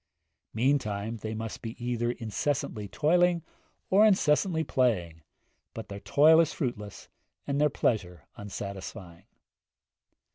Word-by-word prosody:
Meantime 110 -4 0
they 110 0 -5
must 110 0 -6
be 115 0 -6
either 120 -1 -2
incessantly 115 -2 -3
toiling 170 - +2 0.5
or 200 +3 +6
incessantly 180 -4 +3
playing, 90 - 0 0.5
but 115 - -7
their 100 0 -6
toil 150 +8 +5
is 165 -1 +3
fruitless 110 - -5 0.4
and 140 +1 -1
their 150 - +4
pleasure 90 - -1
unsatisfying. 100 -3 -8
120 Hz, 110 wpm, -28 LUFS, 105-150 Hz, 0.5 s, or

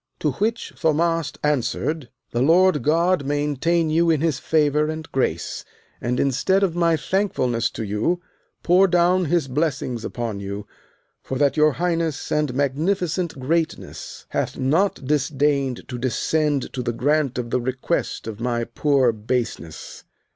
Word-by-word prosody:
To 150 - 0
which 220 - -2
Thaumast 165 -1 0
answered: 150 0 -1 0.2
The 120 - 0
Lord 170 +2 +4
God 165 +4 +2
maintain 150 +3 0
you 165 +2 +3
in 160 -3 +3
his 155 -4 0
favour 150 -1 +2
and 155 0 -5
grace, 85 -11 -1 0.4
and, 125 +1 -1
instead 140 +9 +2
of 175 -4 +1
my 170 -2 +3
thankfulness 145 - 0
to - - -5
you, 105 - 0 0.4
pour 185 +2 +5
down 180 +1 +3
his 165 -2 +1
blessings 130 -4 -1
upon 115 -4 -4
you, 100 +1 -5 0.6
for 130 - -4
that 140 -1 +2
your 155 -1 +4
highness 165 -3 -1
and 150 -3 +1
magnificent 165 +4 0
greatness 160 +5 -3
hath - - -2
not 150 +3 +1
disdained 140 -2 0
to 125 -2 -5
descend 145 +3 0
to 130 - -3
the 120 -1 -2
grant 145 +1 +1
of 120 -1 -3
the 125 - +1
request 130 +2 -2
of 110 -1 -6
my 120 0 -1
poor 130 +1 +2
baseness. 110 -7 -4
145 Hz, 145 wpm, -23 LUFS, 125-165 Hz, 0.6 s, pour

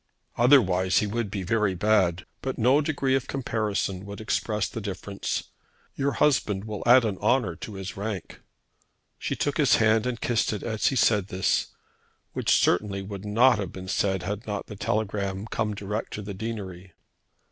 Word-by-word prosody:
"Otherwise 95 -8 +4
he - - +3
would 110 +1 -2
be 100 -2 -4
very 105 0 +1
bad. 90 -3 +2 0.2
But 130 -1 -3
no 130 +6 +4
degree 140 -3 0
of 135 -2 0
comparison 105 -7 -2
would 100 0 -7
express 105 -1 -1
the 115 - -6
difference. 100 0 -4 0.5
Your 140 0 -1
husband 105 -9 +2
will 105 -2 -5
add 125 0 +7
an 100 -4 -2
honour 105 -5 +1
to 105 - -8
his 95 0 -6
rank." 100 -2 -5 0.8
She - - -2
took 145 - -1
his 150 -4 +5
hand 110 +1 +3
and 120 -2 -3
kissed 115 -2 +1
it 105 - -5
as 110 -2 0
he 135 - +1
said 105 -5 +3
this, 95 -1 0 0.7
which - - -2
certainly 100 +1 +1
would 100 0 -7
not 110 +3 +4
have 95 -4 -3
been 95 0 -8
said 95 -1 0
had 105 +4 -4
not 105 -1 -3
that 105 -2 -10
telegram 100 -2 -1
come 110 -1 -2
direct 105 +2 -4
to 105 - -5
the 100 0 -6
deanery. 95 -4 -6
105 Hz, 175 wpm, -26 LUFS, 95-115 Hz, 0.8 s, add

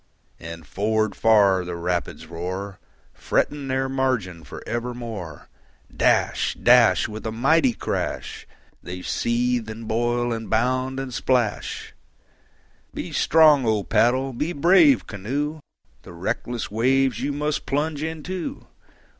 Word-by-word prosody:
And 80 0 -9
forward 110 +6 0
far 100 -4 +4
the 90 0 -5
rapids 85 -1 -3
roar, 90 +4 -5 0.3
Fretting 145 -2 -1
their 130 0 0
margin 130 -11 -1
for 70 - -10
evermore. 115 -9 -5 0.5
Dash, - - +2
dash, 120 -6 +5
With 110 0 -8
a 110 - -3
mighty 135 +3 +3
crash, - - -4 0.3
They 90 +1 -7
seethe, 120 -1 0
and 110 0 -7
boil, 120 +1 0
and 115 -1 -5
bound, 130 +3 0
and 135 -2 -5
splash. 120 -3 -1 1.0
Be - - -5
strong, 155 -3 +5
O 110 -2 +1
paddle! 130 +5 +2
be 150 +8 -2
brave, 190 - +5
canoe! 140 +10 -3 0.4
The - - -12
reckless 115 +7 -3
waves 130 +2 +2
you 140 +2 -1
must 150 +1 -2
plunge 150 +1 -1
into. 160 +3 -5
120 Hz, 120 wpm, -23 LUFS, 105-135 Hz, 1.0 s, dash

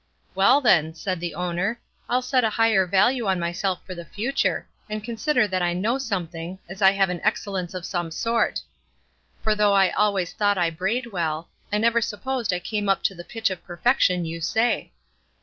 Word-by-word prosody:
'Well 200 +9 +5
then,' 160 - +3
said 185 +2 -3
the 170 -2 -4
owner, 180 +6 -1 0.3
'I'll 250 +1 +1
set 255 0 +2
a 220 - +3
higher 220 -4 +3
value 205 +6 +2
on 190 -2 +1
myself 175 +2 -2
for 185 - -6
the 170 -1 -7
future, 235 - -1 0.2
and 215 0 -4
consider 235 +2 +1
that 185 -2 -1
I 175 0 +1
know 220 +9 0
something, 180 -7 -4
as 190 +3 -9
I 190 - +8
have 195 -2 +2
an 175 - -4
excellence 195 -4 -1
of 180 -2 -5
some 175 -3 -2
sort; 230 +8 0 0.8
for 215 - +2
though 210 -1 +3
I 195 -2 +4
always 200 -4 +1
thought 205 -1 +1
I 170 -2 +1
brayed 225 +9 -2
well, 165 -3 -2 0.2
I 210 - +2
never 235 +2 +3
supposed 235 +2 -2
I 180 - 0
came 205 +2 -2
up 195 - +2
to - - +1
the 175 -2 -9
pitch 225 +1 -2
of 185 - -6
perfection 180 -1 +1
you 165 +1 -5
say. 225 +8 0
195 Hz, 195 wpm, -24 LUFS, 175-225 Hz, 0.8 s, I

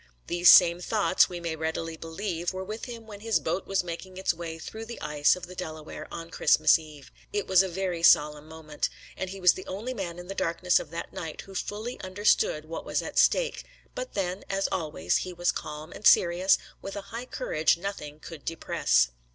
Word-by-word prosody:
These 175 0 +4
same 175 -1 +8
thoughts, 200 -1 +3
we 175 -1 -5
may 170 -1 -3
readily 160 +1 -3
believe, 170 +2 -4
were 185 0 -4
with 215 +4 -6
him 235 -2 -8
when 210 -2 -10
his 225 +1 +1
boat 190 - -2
was 195 -2 +1
making 180 +2 -7
its 190 - +1
way 165 -1 -6
through 220 +7 -8
the 235 - -7
ice 150 +1 +2
of 180 -1 -8
the 180 - -11
Delaware 155 -4 -7
on 165 0 -7
Christmas 155 -2 +5
Eve. 150 -3 -13 0.2
It 205 -1 -1
was 190 -1 +5
a 190 - -1
very 180 -1 -2
solemn 150 -2 +4
moment, 155 -2 -4 0.3
and 190 - -4
he 195 +1 -7
was 180 -1 +6
the 185 - -9
only 215 +7 -4
man 180 -7 -5
in 175 - -8
the 195 - -4
darkness 180 -1 +2
of - - -8
that 170 +1 -6
night 160 -2 -6
who 195 - -13
fully 215 +5 -4
understood 185 -5 +1
what 165 +1 -6
was - - -1
at - - -1
stake; - - +3 0.3
but - - -6
then, 185 0 -2
as 195 0 0
always, 150 - 0
he 185 - -4
was 175 0 +1
calm 150 +2 -7
and 210 - +1
serious, 180 +2 +5 0.2
with 195 - -6
a 200 - -4
high 240 +2 -5
courage 155 - +1
which 170 - -16
nothing 150 -7 -5
could 160 -2 -10
depress. 65 - +1
175 Hz, 210 wpm, -28 LUFS, 160-195 Hz, 0.3 s, same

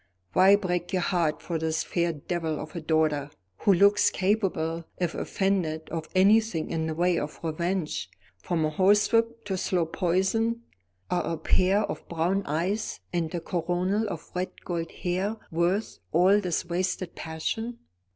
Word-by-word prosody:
Why 190 +2 +7
break 180 -3 -2
your 185 -2 +1
heart 170 -5 0
for 170 -2 -2
this 160 0 0
fair 170 -1 0
devil 160 0 -3
of 155 +2 -8
a 170 - -3
daughter, 155 -2 +1 0.3
who 205 - +3
looks 200 +3 +5
capable, 185 -5 0
if 175 -2 -1
offended, 180 -5 -1
of 160 -1 -4
anything 200 -3 +3
in 160 -1 -1
the 160 - -3
way 175 +1 +2
of 150 - -5
revenge, 160 - -2 0.3
from 165 - 0
a 155 - -1
horsewhip 225 +6 +3
to 195 -2 -2
slow 180 -2 +1
poison? 195 +7 0 0.5
Are 180 - 0
a - - -3
pair 185 +5 +2
of - - -5
brown 175 +4 +1
eyes 180 +9 -1
and 165 -2 -1
a - - 0
coronal 180 +5 -1
of 170 -4 -7
red 180 +1 -4
gold 170 -2 -2
hair 190 +5 -2
worth 175 +6 0
all 185 +5 +5
this 180 -4 -1
wasted 180 0 -2
passion?" 220 +9 -4
175 Hz, 155 wpm, -27 LUFS, 160-195 Hz, 0.5 s, Why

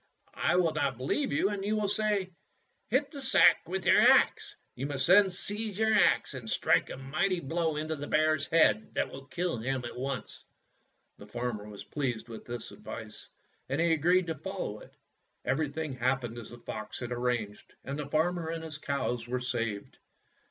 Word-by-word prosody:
"I 170 - +2
will 175 -3 +3
not 120 - 0
believe 140 - -1
you 195 - +2
and 205 -1 -3
will 210 +1 0
say, 205 -2 0 0.6
'Hit 270 +5 +1
the 285 -3 -7
sack 265 - +6
with 190 -1 -3
your - - +6
axe.' - - +4 0.2
"You 135 +3 -4
must 140 -2 0
then 195 +2 +7
seize 205 +3 -2
your 220 0 +3
axe 210 - +3
and 120 -4 -6
strike - - +2
a - - -6
mighty 155 +8 0
blow 165 +1 -1
into 155 +1 -2
the 145 0 -6
bear's 155 -2 +2
head 110 -10 +3
that - - 0
will 135 0 -10
kill 170 +3 -2
him 125 +2 -2
at 120 - -6
once." 135 +1 -5 0.8
The - - -11
farmer 120 -4 -4
was 100 -1 -9
pleased 125 -5 -3
with 115 - -9
this 120 -1 -6
advice, - - -9 0.4
and 140 +3 -1
he 170 0 +3
agreed 175 +4 +3
to 165 -1 -3
follow 160 - -5
it. - - -16 0.5
Everything 150 +1 -1
hap 130 +1 +1
pened 120 0 -5
as 115 - -9
the 120 - -10
fox 110 -2 -6
had 120 -1 -5
arranged, 120 -4 -2
and 140 +2 -5
the 145 - -4
farmer 165 +2 +1
and 165 0 -4
his 155 -2 -7
cows 125 -5 -2
were 125 +1 -1
saved. 115 -5 -3
145 Hz, 185 wpm, -30 LUFS, 125-180 Hz, 0.8 s, then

